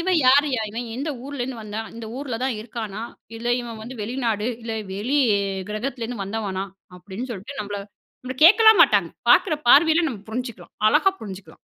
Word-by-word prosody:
இவன் 360 0 +2
யாருயா? 275 -1 +4
இவன் 235 +3 -5
எந்த 285 +4 -3
ஊருலருந்து 265 -3 -5
வந்தான்? 215 +1 -5
இந்த 230 -1 -7
ஊருல 265 -4 -4
தான் 265 -2 0
இருக்கானா? 220 -2 -6 0.4
இல்ல 230 +1 -7
இவன் 230 -2 -8
வந்து 240 +4 -8
வெளிநாடு, 230 -2 -1 0.2
இல்ல 225 -1 -4 0.2
வெளி 230 +9 -1 0.5
கிரகத்திலேருந்து 235 0 -4
வந்தவனா? 195 -2 -3 0.3
அப்டின்னு 205 +7 -7
சொல்லிட்டு 225 +7 -8
நம்மள 205 0 -5 0.4
நம்மள 255 +1 -5
கேட்கலாம் 440 +4 +8
மாட்டாங்க, - - +3 0.2
பார்க்குற 310 - +5
பார்வையில 320 +5 +6
நம்ம 230 -8 -6
புரிஞ்சுக்கலாம், 230 -6 -6
அழகா 315 - +4
புரிஞ்சுக்கலாம். 195 -2 -9
235 Hz, 155 wpm, -23 LUFS, 215-275 Hz, 0.5 s, கேட்கலாம்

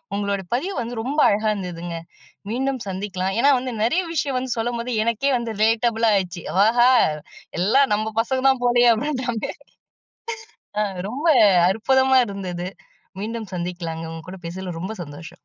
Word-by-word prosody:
உங்களோட 200 -1 -1
பதிவு 365 +10 -2
வந்து 235 0 -5
ரொம்ப 280 +6 -2
அழகா 215 +2 +2
இருந்ததுங்க. 175 -3 -5 0.5
மீண்டும் 265 0 -1
சந்திக்கலாம். 190 0 -3
ஏன்னா 285 +3 +5
வந்து 255 -1 -4
நெறைய 345 +12 +2
விஷயம் 275 -4 0
வந்து 255 -1 -3
சொல்லும்போது, 235 +1 -2
எனக்கே 235 +5 +1
வந்து 235 -2 -4
ரிலேட்டபுளாயிச்சு. 220 -5 +2 0.2
"ஆஹா 240 +2 +5 0.7
எல்லா 225 +9 +4
நம்ப 215 +1 -3
பசங்க 260 +3 -1
தான் 265 -2 +1
போலையே." 240 0 +5
அப்டின்ட்டாங்க 250 -3 -2 1.3
ஆ - - +3 0.3
ரொம்ப 285 +8 -3 0.4
அற்புதமா 265 +5 +3
இருந்தது. 185 -3 -5 0.5
மீண்டும் 220 0 -5
சந்திக்கலாங்க. 170 -2 -4
உங்க 165 0 -9
கூட 190 - -9
பேசுனதுல 180 0 -6
ரொம்ப 215 +4 -4
சந்தோஷம். 165 +3 -10
225 Hz, 135 wpm, -22 LUFS, 190-250 Hz, 1.3 s, ஏன்னா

